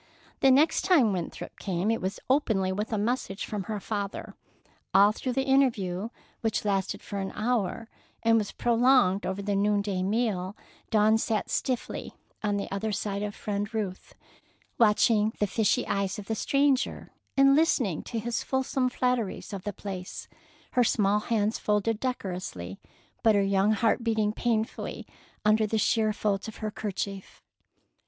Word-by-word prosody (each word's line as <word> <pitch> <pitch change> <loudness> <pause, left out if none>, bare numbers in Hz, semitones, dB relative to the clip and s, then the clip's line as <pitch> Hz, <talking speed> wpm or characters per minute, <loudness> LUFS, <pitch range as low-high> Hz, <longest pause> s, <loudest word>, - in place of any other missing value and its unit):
The 270 - +5
next 285 +5 +4
time 285 - +4
Winthrop 175 -3 -5
came 190 +2 -1
it 225 - -1
was 190 +1 -3
openly, 220 -9 +2
with 210 +4 -3
a 220 - 0
message 210 -2 -2
from 205 -3 -4
her 215 -2 -3
father. 200 -1 -4 0.6
All 200 +2 +7
through 250 +3 -3
the 270 - +1
interview, 230 -8 +1 0.3
which 220 -2 -1
lasted 195 -2 -1
for 200 - -5
an 190 0 -3
hour, 225 -1 -1 0.4
and 225 0 +5
was 210 - -3
prolonged 240 -4 +3
over 190 +1 -3
the 205 0 0
noonday 200 -1 +1
meal, 200 -2 -1 0.3
Dawn 215 +1 +4
sat 220 -1 -1
stiffly 255 -2 -2 0.3
on 205 -1 0
the 200 - -3
other 205 +2 -2
side 200 0 -2
of 205 -1 -4
Friend 205 +1 -3
Ruth, 205 -5 -4 0.6
watching 215 -1 +4
the 210 - +2
fishy 210 +1 +1
eyes 195 -1 -1
of 205 - -7
the 220 - -2
stranger 275 +4 +1 0.3
and 275 0 +6
listening 260 - +2
to 235 - -4
his 230 +1 -2
fulsome 265 -1 0
flatteries 245 -5 -1
of 195 -2 -6
the 205 - -1
place, 185 -2 -7 0.4
her 250 - +3
small 205 -2 +2
hands 215 -1 0
folded 210 +1 0
decorously, 180 - -4 0.4
but 220 -2 +4
her 200 - +3
young 195 +2 +3
heart 225 +2 +1
beating 220 -2 +1
painfully 225 -1 -2 0.4
under 215 0 +4
the 220 - 0
sheer 220 0 +2
folds 205 -1 -1
of 220 - -9
the 215 -1 -3
'kerchief. 200 -2 -5
210 Hz, 160 wpm, -28 LUFS, 200-230 Hz, 0.6 s, All